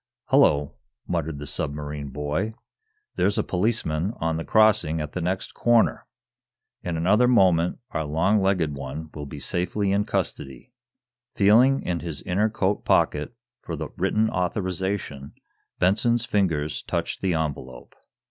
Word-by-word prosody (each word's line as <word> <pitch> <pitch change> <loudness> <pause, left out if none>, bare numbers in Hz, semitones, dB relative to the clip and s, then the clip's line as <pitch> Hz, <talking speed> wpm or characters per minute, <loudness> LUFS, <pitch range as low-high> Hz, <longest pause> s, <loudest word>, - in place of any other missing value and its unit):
"Hullo," 75 -1 +4 0.3
muttered 80 -3 -2
the 75 - -7
submarine 75 0 -4
boy. 75 +10 -3 0.6
"There's 100 - +2
a - - +2
policeman 95 -2 -1
on 80 0 -1
the 80 - -3
crossing 105 -8 +4
at 75 -1 -4
the 90 - -4
next 90 +2 -2
corner. 120 -1 +2 0.7
In 85 -2 -3
another 105 +9 +3
moment 90 -8 +3
our 80 - -2
long 85 +8 +1
legged 90 -6 +1
one 70 +3 -7
will 75 -1 -7
be 75 - -8
safely 90 +6 -1
in 100 +1 +1
custody." 70 - -4 0.6
Feeling 120 +7 +4
in 85 -1 -2
his 80 -4 -6
inner 100 +5 +1
coat 100 -2 -1
pocket 75 +10 +1 0.3
for 85 - -5
the 80 0 -5
written 105 +3 +1
authorization, 90 -5 -3 0.4
Benson's 110 +6 +2
fingers 80 -9 0
touched - - -3
the 95 -3 +1
envelope. 70 -5 -5
90 Hz, 140 wpm, -24 LUFS, 75-100 Hz, 0.7 s, Hullo